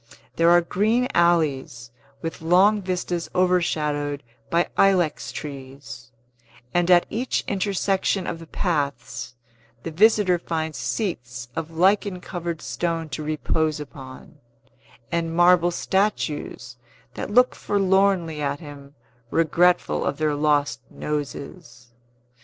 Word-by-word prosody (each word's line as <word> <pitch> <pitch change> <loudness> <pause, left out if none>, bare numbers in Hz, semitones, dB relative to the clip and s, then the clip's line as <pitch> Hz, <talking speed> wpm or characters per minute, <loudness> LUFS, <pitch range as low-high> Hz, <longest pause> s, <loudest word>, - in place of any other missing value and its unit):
There 165 0 +4
are 175 0 +6
green 220 +8 +1
alleys, 140 -8 +1 0.3
with 165 0 -5
long 190 +6 +4
vistas 180 -2 -3
overshadowed 150 -6 0 0.3
by 170 0 +2
ilex 185 -5 +2
trees; 135 -3 -9 0.6
and 175 0 +2
at 175 -1 +6
each 245 +4 -1
intersection 195 -1 0
of 165 - -4
the 165 - -11
paths, 140 -8 -3 0.5
the 165 - -5
visitor 200 0 +4
finds 160 -4 -3
seats 125 - -4
of 165 -1 -4
lichen 185 +3 +2
covered 170 -3 -5
stone 165 -2 -2
to 155 - -5
repose 155 0 -1
upon, 135 0 -11 0.7
and 165 -1 -1
marble 175 0 +5
statues 175 -9 -2 0.4
that - - -5
look 250 +4 +4
forlornly 190 -5 +1
at 145 0 -2
him, 145 -2 -12 0.3
regretful 175 +3 +2
of 140 - -2
their 155 -1 +1
lost 145 -5 +1
noses. 145 -3 -6
165 Hz, 110 wpm, -23 LUFS, 145-180 Hz, 0.7 s, are